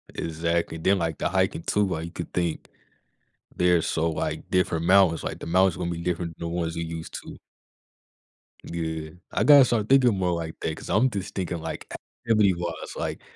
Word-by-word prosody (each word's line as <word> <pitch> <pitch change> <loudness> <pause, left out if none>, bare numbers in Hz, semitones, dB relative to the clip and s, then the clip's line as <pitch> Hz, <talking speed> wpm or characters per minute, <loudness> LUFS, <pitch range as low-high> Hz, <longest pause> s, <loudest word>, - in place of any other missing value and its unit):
Exactly. 85 +1 -1
Then, 95 +4 +2
like, 80 -2 -2
the - - -1
hiking 85 - 0
too, 105 0 +1
like, 85 -2 -3
you 85 - -8
could 85 - -7
think 85 -2 -2 0.9
they're 90 -2 +3
so, 80 +1 0
like, - - -3
different 85 -3 +1
mountains. 95 -3 +4
Like, - - -4
the - - -7
mountains 95 +1 +3
gonna 85 -1 -3
be 85 0 -4
different 85 -2 -3
than 85 - -4
the 85 - -4
ones 85 -1 -2
you 85 - -2
used 80 0 -7
to. - - -9 1.3
Yeah. 80 -2 -4 0.2
I - - +1
gotta 145 -3 +8
start 110 -2 0
thinking 125 -5 +5
more 90 -2 +1
like 80 -1 -5
that 80 - -2
'cause - - -9
I'm 130 +5 +3
just 100 -4 -5
thinking, 90 -3 -3
like, - - -6 0.4
activity-wise. 90 -7 +1
Like, - - -4
85 Hz, 190 wpm, -25 LUFS, 80-95 Hz, 1.3 s, gotta